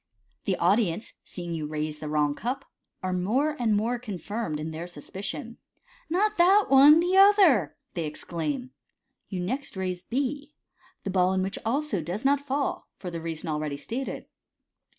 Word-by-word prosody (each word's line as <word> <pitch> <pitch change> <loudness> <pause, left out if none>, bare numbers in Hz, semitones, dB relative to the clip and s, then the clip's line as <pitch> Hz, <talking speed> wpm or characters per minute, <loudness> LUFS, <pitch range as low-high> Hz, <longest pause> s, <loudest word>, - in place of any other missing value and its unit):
The 190 - +1
audience, 195 +2 +1
seeing 175 -2 -6
you 155 -2 -3
raise 150 0 -3
the 155 - -5
wron# 150 -1 +2
cup, 245 - -3 0.4
are 185 0 -1
more 250 +12 +1
and 225 -3 +2
more 235 +3 0
confirmed 205 -6 -4
in 155 +1 -4
their 165 +2 -5
suspicion. 195 - -6 0.3
" - - -29
Not 415 +4 +1
that 390 +4 +5
one, 280 +4 +8
the 355 +2 +2
other,' 390 - +6
' - - -52
they 170 -3 -2
ex 150 - -7
claim. 250 - -3 0.6
You 185 -3 -3
next 255 +4 -3
raise 185 -1 -2
B, 280 +7 -3 0.5
the 195 - -2
ball 185 0 +3
in 190 0 +1
which 190 - -3
also 265 - 0
does 180 - -4
not 280 0 +4
fall, 280 0 -2
for 180 - -6
the 170 - -4
leason 165 -1 -5
already 150 -2 -2
stated. 245 - -4
205 Hz, 170 wpm, -27 LUFS, 170-280 Hz, 0.6 s, one